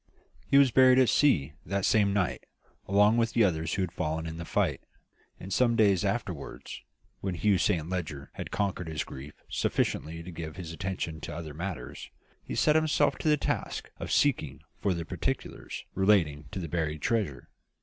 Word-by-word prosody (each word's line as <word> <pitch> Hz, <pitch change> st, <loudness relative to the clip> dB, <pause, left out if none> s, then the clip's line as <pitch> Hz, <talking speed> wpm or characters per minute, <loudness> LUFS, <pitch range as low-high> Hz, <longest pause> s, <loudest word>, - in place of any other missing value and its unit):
"He 140 Hz, -, +4 dB
was 140 Hz, -3 st, +6 dB
buried 130 Hz, 0 st, +6 dB
at 130 Hz, -2 st, +5 dB
sea, 80 Hz, -, +3 dB
that 100 Hz, -1 st, -1 dB
same 105 Hz, -2 st, +4 dB
night, 100 Hz, -3 st, -1 dB, 0.4 s
along 105 Hz, +3 st, +4 dB
with 115 Hz, -1 st, +1 dB
the 115 Hz, -, +4 dB
others 80 Hz, -4 st, 0 dB
who 95 Hz, -, 0 dB
had 90 Hz, -, -3 dB
fallen 80 Hz, -2 st, -2 dB
in 80 Hz, 0 st, -5 dB
the 85 Hz, -, -6 dB
fight; -, -, 0 dB, 0.6 s
and 95 Hz, +1 st, -6 dB
some 120 Hz, +1 st, +3 dB
days 100 Hz, -5 st, +4 dB
afterwards, -, -, -4 dB, 0.4 s
when 95 Hz, -2 st, -3 dB
Hugh 100 Hz, +2 st, +2 dB
Saint 85 Hz, -6 st, +1 dB
Leger 80 Hz, -6 st, -4 dB
had -, -, -6 dB
conquered 95 Hz, -4 st, -2 dB
his 80 Hz, -1 st, -2 dB
grief 70 Hz, +3 st, -10 dB
sufficiently 80 Hz, +2 st, -1 dB
to 90 Hz, -, -8 dB
give 80 Hz, -2 st, -6 dB
his 85 Hz, -4 st, -7 dB
attention 85 Hz, -3 st, -4 dB
to 85 Hz, -, -6 dB
other 80 Hz, -2 st, -6 dB
matters, 90 Hz, +3 st, -6 dB, 0.3 s
he -, -, -5 dB
set 150 Hz, -, +3 dB
himself 155 Hz, -2 st, +2 dB
to 155 Hz, -, +1 dB
the 150 Hz, -, +4 dB
task -, -, -3 dB
of -, -, -5 dB
seeking 80 Hz, -, +1 dB, 0.2 s
for 95 Hz, -3 st, +1 dB
the 85 Hz, -1 st, -4 dB
particulars -, -, -4 dB
relating 90 Hz, -7 st, +2 dB
to -, -, -7 dB
the 85 Hz, -3 st, -3 dB
buried 80 Hz, -2 st, -2 dB
treasure. 105 Hz, -12 st, -1 dB
90 Hz, 180 wpm, -29 LUFS, 80-105 Hz, 0.6 s, was